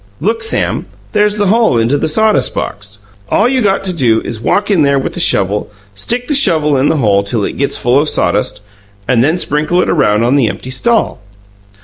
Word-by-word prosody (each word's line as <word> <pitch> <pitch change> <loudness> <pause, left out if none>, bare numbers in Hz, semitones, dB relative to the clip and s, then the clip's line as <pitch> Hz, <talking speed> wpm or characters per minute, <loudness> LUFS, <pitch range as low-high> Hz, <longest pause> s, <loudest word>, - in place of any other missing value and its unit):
"Look, 220 +9 -1
Sam; 445 - -1 0.2
there's 210 0 +1
the 205 - 0
hole 220 - +2
into 115 +4 +1
the 150 +2 -1
sawdust 215 +7 +1
box! 100 0 -6 0.3
All 215 - +2
you 260 0 0
got 195 -3 0
to 185 -1 -2
do 120 -9 +1
is 110 -2 -6
walk 205 - 0
in 185 -5 +2
there 140 -1 +2
with 135 - -3
the - - -6
shovel, 100 - +1 0.2
stick 240 - -3
the 300 - -1
shovel 160 - +2
in 135 +2 +1
the 160 - 0
hole 100 -7 +2
till 100 +2 -2
it - - -5
gets 140 +1 0
full 125 +3 +2
of 150 +1 0
sawdust, 105 0 -1 0.5
and 125 -2 +2
then 155 +6 +1
sprinkle 155 +1 0
it - - +1
around 105 +2 +1
on 125 +4 +2
the 130 -5 +2
empty 130 - -6
stall." 230 - 0
145 Hz, 215 wpm, -13 LUFS, -, 0.5 s, hole